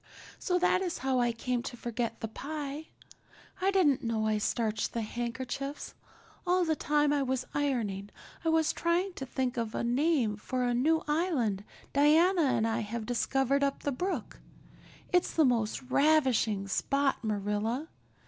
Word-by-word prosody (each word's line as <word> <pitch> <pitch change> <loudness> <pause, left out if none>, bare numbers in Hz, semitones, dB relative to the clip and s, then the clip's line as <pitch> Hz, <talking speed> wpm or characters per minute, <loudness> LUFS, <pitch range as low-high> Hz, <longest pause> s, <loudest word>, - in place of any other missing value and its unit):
So 360 - +1
that 360 +1 +3
is 360 -3 -2
how 260 -1 +2
I 240 -1 +2
came 245 +1 -2
to 245 0 -7
forget 235 0 -3
the 225 - -2
pie. 290 +5 -6 0.7
I 380 - +3
didn't 355 -9 +3
know 225 -2 0
I 215 -1 +1
starched 220 0 -1
the 230 - -1
handkerchiefs. 255 +5 -4 0.5
All 360 0 +3
the 320 -1 +1
time 295 -1 +2
I 290 - +1
was 260 -1 -1
ironing 225 -9 -1 0.3
I 325 - +1
was 320 -1 +2
trying 350 +3 0
to 270 -5 -6
think 255 0 -2
of 230 -1 -2
a - - -1
name 245 -3 +1
for 255 +4 -2
a 245 0 +1
new 315 +7 +2
island 295 - 0 0.3
Diana 325 +6 +5
and 225 -4 +2
I 225 +1 0
have 220 +1 -4
discovered 270 +3 +1
up 275 0 -1
the 285 - 0
brook. 360 +9 -3 0.7
It's 360 0 +2
the 315 - +5
most 235 -1 0
ravishing 255 -8 +2
spot, 275 +6 0
Marilla. 215 +6 -1
260 Hz, 160 wpm, -30 LUFS, 230-305 Hz, 0.7 s, Diana